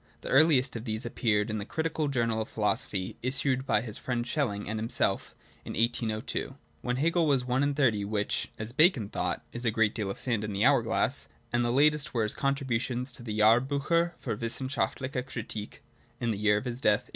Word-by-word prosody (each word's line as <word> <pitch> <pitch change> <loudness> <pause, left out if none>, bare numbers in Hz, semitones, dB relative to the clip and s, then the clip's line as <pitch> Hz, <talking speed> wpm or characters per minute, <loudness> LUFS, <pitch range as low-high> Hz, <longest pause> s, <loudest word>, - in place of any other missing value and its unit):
The - - -7
earliest 135 -3 +4
of 115 0 -5
these 110 -1 -1
appeared 110 -2 0
in 110 - -2
the - - -3
Critical 160 +5 -2
Journal 115 -5 0
of 110 - -5
Philosophy, 100 -3 -1
issued 130 +1 0
by 105 - +3
his 110 -3 -6
friend 120 -2 -2
Schelling 115 -8 -1
and 110 +1 -2
himself, 115 +2 -1 0.3
in - - -6
1802 115 +2 -1
— - - -36
when 125 0 -1
Hegel 165 +4 +2
was 135 -4 +2
one 125 +1 +1
and 145 0 +1
thirty, 120 -8 +2
which, 105 0 -1
as 110 +1 -3
Bacon 135 - +4
thought, 90 -3 -2
' - - -31
is 120 - -4
a 115 - +3
great 110 -1 +2
deal 105 -4 -3
of 100 - -4
sand 115 -4 -1
in 105 -1 -3
the 100 +4 +1
hour 140 -2 +5
glass 115 +3 0
'; 120 0 -33
and 120 0 +2
the 120 - +1
latest 145 +2 +3
were 115 - +2
his 105 - -1
contributions 130 -2 -1
to 120 - -7
the 110 -3 -4
Jahrbiicher 140 +10 +3
fur 115 -4 -3
wissenschaftliche 130 +3 -2
Kritik, 110 -4 -6 0.4
in 120 - 0
the 105 - -2
year 105 0 +3
of 105 - -4
his 125 0 -4
death 105 0 +4
(1831). - - -25
120 Hz, 215 wpm, -29 LUFS, 110-135 Hz, 0.4 s, hour